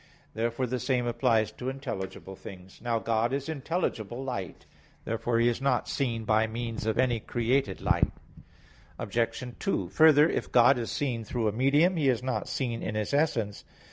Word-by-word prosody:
Therefore 115 +3 -1
the 125 +1 -2
same 125 -1 0
applies 115 -3 +2
to 125 +4 -5
intelligible 95 -8 -6
things. 95 0 -12
Now 120 -1 0
God 115 +1 0
is 140 +1 -2
intelligible 135 - -3
light. 100 -10 -5 0.4
Therefore 115 +1 -1
He 115 +1 +4
is 120 +1 0
not 140 - +1
seen 115 -5 -1
by 110 +1 +3
means 115 -1 -4
of 110 - 0
any 120 -3 +2
created 120 -2 0
light. - - +2 0.9
Obj. 115 +3 -1 0.2
2: 95 - -1
Further, 150 - +6
if - - -2
God 125 +1 +6
is 115 - -3
seen 125 -5 -2
through 115 +1 -1
a - - +2
medium, 145 - +3
He 145 -4 +3
is 125 -1 +1
not 130 - -2
seen 120 -4 -2
in 105 - -3
His 105 +5 -2
essence. 120 -9 0
120 Hz, 170 wpm, -28 LUFS, 110-135 Hz, 0.9 s, Further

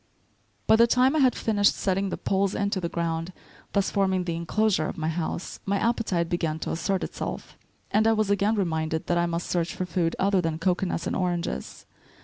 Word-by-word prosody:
* - - -41
By 220 - +5
the 235 +1 +6
time 255 +4 +3
I - - +3
had 260 -3 +4
finished 205 -2 +2
setting 195 0 0
the - - -3
poles 195 0 0
into 200 -1 -1
the 170 - -2
ground, 165 0 -2 0.4
thus 200 -1 +1
forming 190 -2 +1
the 170 -2 -2
enclosure 170 0 +1
of - - -5
the 160 -1 -3
house, 165 +1 -4
my 200 0 0
appetite 205 -6 0
began 165 -3 -1
to - - -3
assert 190 +3 -1
itself; - - -5 0.4
and 215 +2 +3
I 225 - +5
was 215 -2 +1
again 200 +2 +2
reminded 160 -5 -1
that 175 0 +1
I 170 - +2
must 170 +1 -2
search 175 -1 -1
for 185 - -2
food 165 -1 -1
other 195 -1 +2
than 165 -2 -2
cocoanuts 175 0 0
and - - -1
oranges. 175 - -3
185 Hz, 205 wpm, -26 LUFS, 170-200 Hz, 0.4 s, the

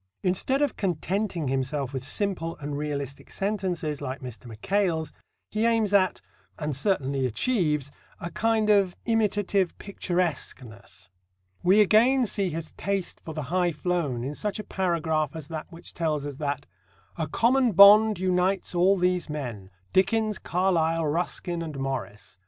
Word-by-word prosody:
Instead 260 +10 +1
of 285 - 0
contenting 185 -2 -1
himself 135 +1 -1
with 130 -1 -3
simple 165 +2 -2
and 145 0 -5
realistic 140 -2 -4
sentences 185 -7 -2
like 130 +1 -4
Mr. 125 -1 -9
Mackail's, 160 - -1 0.4
he 215 +1 0
aims 225 -3 +1
at 190 -2 +3 0.4
and 150 -3 -3
certainly 140 -6 0
achieves 150 - 0 0.3
a 170 - -5
kind 220 +2 +2
of 195 -3 +3
imitative 205 -5 +1
picturesqueness. 175 - -4 0.5
We 195 +4 +5
again 240 +6 +4
see 195 -2 -2
his 165 -1 -5
taste 195 -2 -3
for 160 - -7
the 155 - -3
high 180 -1 +2
flown 150 -7 -1
in 140 +3 -3
such 210 +6 -3
a 215 - -5
paragraph 160 -6 -1
as 155 -3 -8
that 160 0 -6
which 170 0 -10
tells 155 -4 -1
us 145 -2 -6
that 145 -1 -3 0.5
"a 160 -2 -2
common 240 - +2
bond 210 +3 +8
unites 185 +1 0
all 185 +3 +4
these 180 -2 0
men 120 -10 -5 0.2
Dickens, 215 +2 +2
Carlyle, 165 -2 +1
Ruskin 170 +2 -2
and 155 -4 -5
Morris. 125 -8 -5
175 Hz, 145 wpm, -26 LUFS, 145-200 Hz, 0.5 s, bond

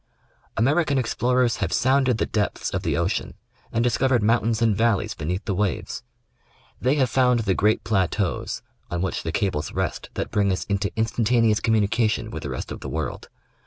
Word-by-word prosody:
American 145 +5 +2
explorers 125 -1 +1
have 90 -4 -2
sounded 130 +3 +3
the - - 0
depths 105 -2 -2
of - - -1
the - - -1
ocean - - -1 0.4
and 115 - +1
discovered 125 -1 +2
mountains 115 0 +2
and 115 -3 +3
valleys 110 -1 +1
beneath 90 +6 -3
the 100 - -1
waves. 100 -1 -2 0.8
They 130 +3 +2
have 135 -3 +3
found 125 -1 +3
the 100 -3 +1
great 105 +4 +2
plateaus 95 -2 -1 0.3
on 90 0 -2
which 95 - -2
the 80 - -3
cables 80 -6 -1
rest - - -3
that - - -3
bring 100 -1 +2
us 95 - -1
into 100 0 -1
instantaneous 115 -1 +2
communication 110 0 +1
with - - -5
the - - -5
rest - - -5
of - - -6
the 70 - -6
world. 80 +3 -4
110 Hz, 175 wpm, -24 LUFS, 100-120 Hz, 0.8 s, sounded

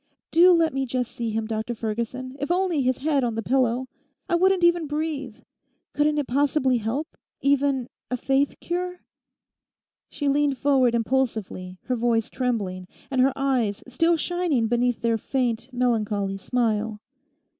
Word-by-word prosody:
Do 350 +3 +7
let 330 -3 +3
me 270 0 -1
just 250 -1 -2
see 235 -1 -3
him, 220 0 -2
Dr 220 +2 -3
Ferguson, 235 +4 -4
if 285 - -3
only 355 -4 +1
his 255 -1 +1
head 285 -1 +1
on 235 -2 -1
the 225 - -2
pillow! 255 0 +1 0.4
I 370 - -2
wouldn't 370 +1 +3
even 345 -2 +4
breathe. 295 -5 -3 0.6
Couldn't 300 0 +2
it 295 - 0
possibly 265 -1 +2
help—even 275 +1 -1 0.2
a 250 - -1
faith 270 +3 0
cure?' 360 +1 -3 1.1
She 290 - -3
leant 285 -1 +2
forward 260 -4 +3
impulsively, 225 -7 -1
her 255 - -1
voice 230 -2 0
trembling, 200 -8 -2 0.2
and 260 -2 +2
her 270 +2 +4
eyes 255 -7 0
still 330 +7 +2
shining 340 -7 0
beneath 240 +1 +1
their 230 -1 +2
faint, 245 -1 -1
melancholy 215 -6 0
smile. 220 -1 -1
255 Hz, 145 wpm, -25 LUFS, 230-290 Hz, 1.1 s, Do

